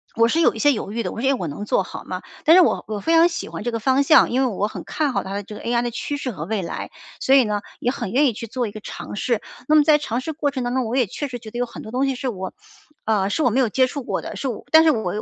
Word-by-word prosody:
我 230 0 +4
是 325 - +1
有 - - +4
一 - - -6
些 290 -1 +5
犹 215 -5 -3
豫 230 -1 -2
的， - - -3
我 - - -7
说 265 - 0
“诶， 275 - +4
我 185 -9 -3
能 205 +9 -6
做 - - +1
好 - - -9
吗？” - - -5 0.2
但 325 +3 +7
是 370 - +8
我 - - +1
我 215 -1 -3
非 325 - +1
常 330 +1 +7
喜 335 - -5
欢 - - -6
这 240 - -1
个 230 - -1
方 260 +4 +2
向， 310 -2 +5
因 255 - +1
为 265 - +3
我 205 -2 -1
很 - - -7
看 300 -3 -1
好 - - -1
它 195 - -5
的 200 0 -3
这 210 +2 -10
个 - - -9
AI 235 0 0
的 240 - -2
趋 285 +5 -3
势 265 -3 -3
和 155 -6 -6
未 210 0 -2
来， 170 - -5 0.3
所 265 - +4
以 265 - +7
呢， 210 -1 -1 0.2
也 245 - +1
很 235 -7 -5
愿 285 +4 +4
意 - - +2
去 230 - -7
做 245 +2 -2
一 - - -7
个 215 - -8
尝 205 - -8
试。 235 -2 0 0.3
那 310 - +4
么 300 - +7
在 300 0 +5
尝 255 -4 -3
试 320 - -4
过 290 -1 -1
程 260 -3 -3
当 245 0 -2
中， 260 -1 0
我 225 +3 -2
也 255 -3 +3
确 290 +9 -4
实 250 -2 -6
觉 220 -2 -11
得 240 - -5
有 245 - +1
很 - - -10
多 220 - -9
东 260 +3 +1
西 270 - -1
是 255 +1 -3
我， 190 -4 -5 0.5
呃， 205 -3 +1
是 305 +9 0
我 250 - +4
没 250 +5 +1
有 250 - +3
接 255 +4 +2
触 280 +1 -5
过 - - -2
的， - - -7
是 275 - -3
我 240 - -4
但 320 0 +8
是 315 - +6
我 215 -4 -2
245 Hz, 375 characters per minute, -22 LUFS, 220-275 Hz, 0.5 s, 是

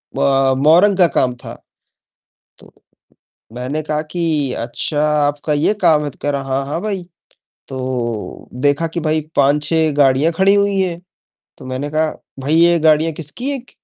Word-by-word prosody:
ब 135 -1 +2
मौरंग 185 +6 +5
का 180 -3 +5
काम 125 -5 0
था। - - -7 1.1
तो - - -17 0.8
मैंने 130 +5 -3
कहा 150 0 -2
कि 155 -6 -1
"अच्छा 125 +6 -2 0.3
आपका 145 +1 -2
ये 150 +8 +2
काम 155 -4 +4
है!" 145 - -3
तो - - -16
कह 145 - -1
रहा 140 -1 -2
"हाँ, 135 +1 -1
हाँ 150 +5 -3
भई।" 200 -4 -3 0.6
तो 125 -4 -4 0.2
देखा 145 +3 +2
कि 165 +1 -4
भाई 155 0 0
5-6 150 +3 +2
गाड़ियाँ 140 +3 +3
खड़ी 190 +4 +3
हुई 200 -1 +1
हैं, 175 -2 -2 0.6
तो 130 - -11
मैंने 130 +3 -4
कहा 155 +1 0 0.3
"भई, 140 +4 -1
ये 170 +1 +4
गाड़ियाँ 155 +1 +3
किसकी 165 - -5
एक" 255 -2 -8
150 Hz, 160 wpm, -17 LUFS, 140-170 Hz, 1.1 s, मौरंग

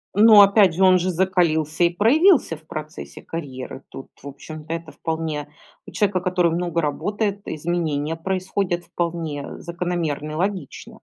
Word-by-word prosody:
Но 215 0 +8
опять 200 -3 +5
же, 190 - +2
он 185 -1 +6
же 185 +1 -1
закалился 170 -3 +1
и - - +4
проявился 255 - +3
в 155 +1 -19
процессе 155 +2 -8
карьеры. 135 -4 -7
Тут, 135 - -10
в 140 - -10
общем-то, 155 +3 -9
это 165 -1 -5
вполне 160 -2 -4 0.4
у - - -9
человека, 200 -3 +1
который 180 -1 +1
много 170 -1 -1
работает, 205 +7 -2
изменения 160 -1 -2
происходят 185 0 -2
вполне 165 -4 -4
закономерно 170 -4 -3
и - - -5
логично. 185 -4 -4
170 Hz, 145 wpm, -22 LUFS, 155-185 Hz, 0.4 s, Но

